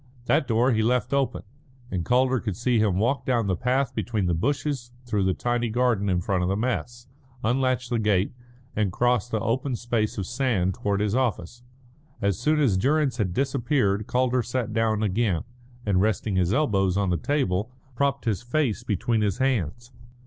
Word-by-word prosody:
That 135 - +2
door 120 +3 +3
he 110 -2 +2
left 125 +2 +1
open, 140 -1 0 0.5
and 90 -3 -1
Calder 130 +3 +2
could 105 -5 -4
see 120 0 +1
him 105 -4 +2
walk 120 +5 +1
down 120 -4 +1
the 95 -2 +1
path 125 +5 0
between 110 -5 -1
the 90 - +1
bushes 130 - -1
through 105 -5 0
the 95 - +1
tiny 120 -1 -1
garden 115 -4 +1
in 90 -1 +1
front 95 0 0
of 90 - 0
the 95 - +1
mess, 120 +1 -3 0.4
unlatch 125 +1 +1
the 120 -1 -1
gate, 105 -3 +1 0.4
and 105 -3 +1
cross 120 +2 +1
the 110 - -1
open 120 +4 -1
space 115 -2 -1
of 95 - -2
sand 120 -6 0
towards 100 +2 -1
his 105 -1 0
office. 120 -3 -1 0.6
As 100 -3 0
soon 150 +4 +2
as 120 -11 +3
Durrance 135 +3 +1
had 100 -6 0
disappeared 120 -4 0
Calder 125 0 +1
sat 120 -1 -3
down 110 -1 +1
again, 105 -4 0 0.4
and, 95 -3 +2
resting 105 -1 0
his 90 -1 +2
elbows 100 -9 +2
on 100 -2 +1
the 85 - +1
table, 110 - -1 0.2
propped 140 +1 0
his 110 -5 0
face 120 -2 -1
between 110 +1 0
his 100 -3 0
hands. 120 - -1
115 Hz, 185 wpm, -25 LUFS, 100-125 Hz, 0.6 s, door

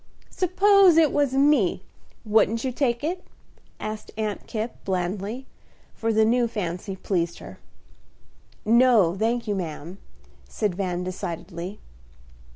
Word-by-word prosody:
"Suppose 380 -1 +4
it 315 -3 +5
was 285 -3 +1
me, 270 -10 +3 0.4
wouldn't 220 +1 +2
you 260 - -1
take 245 -2 -1
it?" 355 +4 -2 0.6
asked 215 0 -6
Aunt 215 -2 -3
Kipp, 225 +1 -5
blandly, 195 +6 -3 0.5
for 225 0 -1
the 220 0 +4
new 240 +1 +2
fancy 190 -3 -4
pleased 175 -3 -2
her. - - -11 1.1
"No, 225 -6 +5
thank 230 +3 -1
you, 205 - 0
ma'am," 175 0 -6 0.5
said 210 -4 -1
Van, 180 -1 -2
decidedly. 180 0 -6
215 Hz, 120 wpm, -24 LUFS, 185-250 Hz, 1.1 s, it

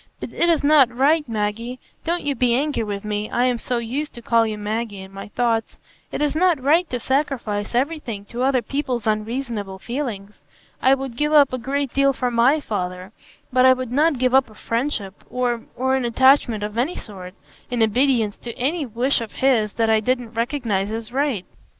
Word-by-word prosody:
But - - -7
it 345 - +2
is 325 -4 +2
not 285 -4 +6
right, 285 +3 +2
Maggie,—don't 230 +10 -3
you 290 - 0
be 250 -3 +2
angry 290 0 0
with 205 -1 -5
me, 210 0 -2
I 245 - +1
am 250 -2 +1
so 245 +2 -2
used 255 +6 -3
to 235 - -9
call 230 -1 +3
you 215 -1 -4
Maggie 210 -1 -3
in 190 0 -11
my 195 - -8
thoughts,—it 225 +1 -3
is 295 0 0
not 345 -2 +3
right 310 +6 +3
to 250 - -2
sacrifice 240 -6 -1
everything 250 -6 -2
to 240 +4 -6
other 260 -2 +2
people's 255 -2 -2
unreasonable 215 -2 -2
feelings. 215 -3 -5 0.4
I 265 +1 +5
would 270 -3 -6
give 300 +4 0
up 285 -4 +6
a 255 - -1
great 275 +2 -2
deal 275 0 +3
for 250 -1 -1
my 245 +6 +4
father; 185 -6 -4 0.4
but 255 0 +4
I 260 0 +8
would 255 -2 -5
not 295 +2 +3
give 255 0 +1
up 265 -2 +4
a 215 - -16
friendship 230 -6 -3
or—or 250 +1 -1
an 265 - 0
attachment 240 -2 +3
of 210 +2 -3
any 290 +9 0
sort, 185 -3 -9 0.3
in 240 -2 +1
obedience 225 -1 +2
to 235 0 -8
any 285 +3 -1
wish 245 +3 +1
of 225 - -7
his 230 -6 +2
that 225 -1 +1
I 220 - +4
didn't 245 0 -1
recognise 230 -5 -1
as 225 +1 -5
right." 265 -7 -1
245 Hz, 195 wpm, -22 LUFS, 220-275 Hz, 0.4 s, I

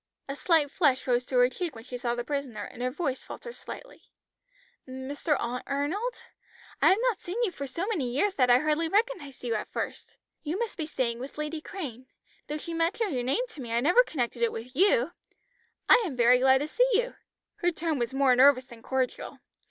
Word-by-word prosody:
A 275 - -4
slight 305 -2 +2
flush 275 -7 +2
rose 245 -1 +1
to 255 - 0
her 245 0 +6
cheek 320 +4 -4
when 225 - -10
she 250 +1 -8
saw 240 -1 -1
the 240 - -3
prisoner, 260 -6 -3
and 245 - -9
her 250 - +1
voice 270 -1 -2
faltered 475 - -8
slightly. - - -10 0.9
"Mr. 270 +3 -2
Arnold? 285 - -2 0.6
I - - +7
have 380 - +5
not - - +1
seen 360 +5 -5
you 425 - +1
for 280 -5 -6
so 335 +7 -3
many 345 - -1
years 370 +11 +1
that 255 -6 +2
I 245 - +8
hardly 305 +3 +1
recognised 380 - -1
you 240 -2 -1
at 215 - -3
first. - - -5 0.3
You 315 +4 -3
must 465 0 -3
be 315 -4 -4
staying 240 -6 -1
with 265 +4 -8
Lady 300 +1 -3
Crane; 260 - -7 0.4
though 300 - -3
she 335 +2 -6
mentioned 335 +4 0
your 250 - 0
name 275 - 0
to 315 - -10
me 235 -2 -5
I 235 - +3
never 345 - +5
connected 245 - -3
it 235 - +3
with 245 +3 -8
you. 340 - +3 0.8
I 485 - +7
am 330 -10 -3
very 245 +1 +5
glad 265 +1 +5
to 295 - -2
see - - +2
you." 485 +4 +1 0.4
Her 350 - +2
tone 325 -3 -2
was 235 -1 -1
more 265 -1 +4
nervous 260 0 +6
than 235 -3 -14
cordial. 260 +1 -2
280 Hz, 210 wpm, -28 LUFS, 250-345 Hz, 0.9 s, I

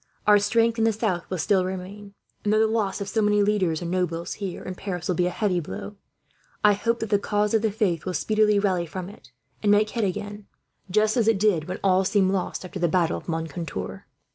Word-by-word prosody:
Our 210 -1 +6
strength 230 +2 +2
in - - +3
the 225 - +4
south 200 -5 -2
will 185 - -2
still 185 +3 +2
remain 190 +2 -7 0.3
and, 210 - +1
though 215 - +4
the - - +5
loss 215 -3 -1
of 200 - -3
so 220 +2 0
many 210 0 +3
leaders 185 -6 +1
and 170 - -4
nobles, 170 -2 -1
here 190 -3 -4
in 185 - -5
Paris, 180 -2 -5
will 185 - +1
be 180 +1 +1
a - - +1
heavy 185 -1 0
blow, 190 +5 -7 0.7
I 210 0 +6
hope 230 +3 -1
that 225 -1 -4
the 205 - +4
cause 210 +1 0
of 220 - +3
the 220 - +1
faith 195 -7 0
will 185 -1 -3
speedily 215 -1 +2
rally 185 -4 +1
from 185 +2 -6
it 130 -10 -16 0.3
and 205 - +3
make 210 +1 +3
head 230 - -1
again; 205 +1 -4 0.4
just 215 +4 +2
as 225 -3 +2
it 225 -3 +4
did 195 -7 +2
when 185 - -4
all 190 -1 +4
seemed 190 -1 +2
lost, 190 -1 -2
after 185 +1 -7
the 175 - +2
battle 170 0 +1
of - - -11
Moncontour." 165 0 -5
200 Hz, 235 wpm, -25 LUFS, 180-210 Hz, 0.7 s, Our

